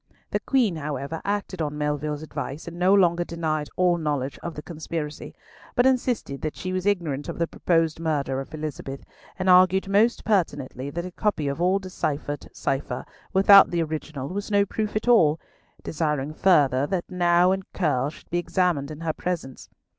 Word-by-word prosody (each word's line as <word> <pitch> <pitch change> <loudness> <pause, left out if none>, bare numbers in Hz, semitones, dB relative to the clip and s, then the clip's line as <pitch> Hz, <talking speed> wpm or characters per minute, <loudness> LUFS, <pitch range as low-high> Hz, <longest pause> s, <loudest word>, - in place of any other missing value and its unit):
The - - +1
Queen, 235 -11 +1
however, 145 +1 -4
acted 200 -3 -2
on 150 -1 -2
Melville's 150 0 -2
advice, 150 0 -6
and 170 +1 -7
no 180 +2 +4
longer 175 -3 +4
denied 155 -3 -2
all 180 -1 +2
knowledge 145 -4 -2
of 170 - -6
the 150 - -7
conspiracy, 160 -2 -6 0.4
but 245 - +4
insisted 250 - 0
that 155 - -3
she 185 0 -4
was 185 +1 -1
ignorant 160 -8 -1
of - - -5
the 170 - +1
proposed 165 -1 0
murder 145 -5 -1
of 135 - -10
Elizabeth, 150 -3 -6 0.3
and 185 - -2
argued 185 +1 +5
most 210 +4 +2
pertinently 140 - -1
that 170 +4 -4
a 180 - -6
copy 175 -6 -1
of 140 +4 -2
a 185 +2 +3
deciphered 150 -6 -4
cipher, 135 -2 -3 0.3
without 195 +1 +8
the 170 -1 0
original, 155 -3 -5
was 205 +4 -4
no 200 -1 +3
proof 215 +1 -3
at 215 - -2
all, 165 -10 +5 0.4
desiring 150 -2 -1
further 145 -7 +3
that 180 0 -2
Nau 175 0 +3
and 190 0 -3
Curll 145 -7 0
should 155 - -15
be 175 - +1
examined 175 -5 0
in 155 +1 -8
her 165 -1 -1
presence. 165 -8 -5
165 Hz, 175 wpm, -25 LUFS, 150-185 Hz, 0.4 s, without